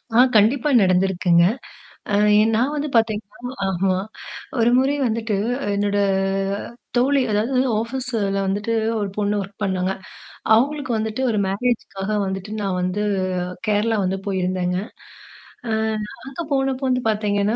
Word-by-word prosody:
ஆ, - - +5 0.2
கண்டிப்பா 240 +7 +4
நடந்திருக்குங்க. 180 -2 +3 0.7
அ - - 0 0.4
நான் 255 +6 +1
வந்து 300 0 -2
பார்த்திங்கன்னா, 225 +2 -1 0.2
ஆமா 185 0 +1 0.6
ஒரு 235 +1 +4
முறை 270 +2 +2
வந்துட்டு 225 -2 -1 0.4
என்னோட 205 0 0 1.0
தோழி 270 +2 +3
அதாவது 230 +6 +1 0.2
ஆஃபீஸ்ல 230 -5 -2
வந்துட்டு 205 +4 -1 0.3
ஒரு 205 -1 -2
பொண்ணு 205 0 +1
வொர்க் 200 +2 -10
பண்ணாங்க. 190 -1 0 0.6
அவங்களுக்கு 275 +2 0
வந்துட்டு 220 +4 -2
ஒரு 210 - 0
மேரேஜ்க்காக 200 -1 -2
வந்துட்டு 190 +2 -4
நான் 190 -2 -1
வந்து 185 +3 -1 0.7
கேரளா 215 +2 +2
வந்து 190 +1 -1
போயிருந்தேங்க. 185 -2 -1 0.9
ஆ - - -1 0.5
அங்க 270 +5 -6
போனப்போ 270 -1 0
வந்து 255 0 +1
பார்த்தீங்கன்னா 210 0 +1
210 Hz, 120 wpm, -22 LUFS, 195-245 Hz, 1.0 s, ஆ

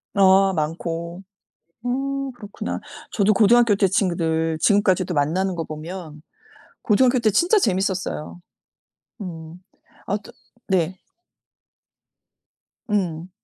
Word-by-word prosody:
어 195 0 +5
많고. 170 +3 -3 0.6
어 275 +2 -2
그렇구나. 210 -4 -6 0.3
저도 210 0 +3
고등학교 225 +2 +5
때 195 -1 +3
친구들 165 -4 0
지금까지도 190 -3 +3
만나는 175 +6 0
거 165 - -2
보면 155 0 -8 0.6
고등학교 250 +4 +3
때 225 -2 +3
진짜 355 - +3
재밌었어요. 185 - -2 0.8
음. 165 -3 -8 0.5
아 200 - 0
또 - - -13 0.4
네. 185 -2 +1 1.9
음. 180 -4 -1
190 Hz, 205 characters per minute, -22 LUFS, 165-210 Hz, 1.9 s, 어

